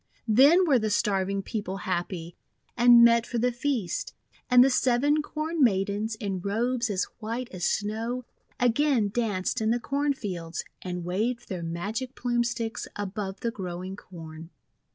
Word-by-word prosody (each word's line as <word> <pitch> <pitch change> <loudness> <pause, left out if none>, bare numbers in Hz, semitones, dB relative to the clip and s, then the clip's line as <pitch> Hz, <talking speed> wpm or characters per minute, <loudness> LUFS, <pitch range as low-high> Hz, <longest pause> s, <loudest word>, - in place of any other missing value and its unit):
Then 280 - +6
were 275 -7 +4
the 215 -1 -1
starving 195 -2 0
people 205 -3 -4
happy, 175 -2 -3 0.4
and 240 -1 +7
met 235 0 +4
for 240 - -3
the 245 +2 +2
feast. 245 -6 -2 0.3
And 250 -1 +8
the 270 - +4
Seven 265 +5 +2
Corn 310 +1 -2
Maidens, 205 0 +1
in 200 -3 -3
robes 235 +5 0
as 195 -2 0 0.2
white 230 +3 -4
as 180 -2 -3
snow, 225 +4 -2 0.3
again 245 -2 +2
danced 205 -3 -1
in 220 - +1
the 235 +2 +2
corn 280 +3 0
fields, 175 -9 -5 0.2
and 180 -1 -5
waved 220 +7 -2
their 185 -3 -4
magic 205 +10 -4
Plume 240 -1 0
Sticks 235 -1 -3
above 200 -1 -5
the 235 - -1
growing 185 -2 -6
Corn. 165 -4 -11
220 Hz, 155 wpm, -27 LUFS, 190-245 Hz, 0.4 s, And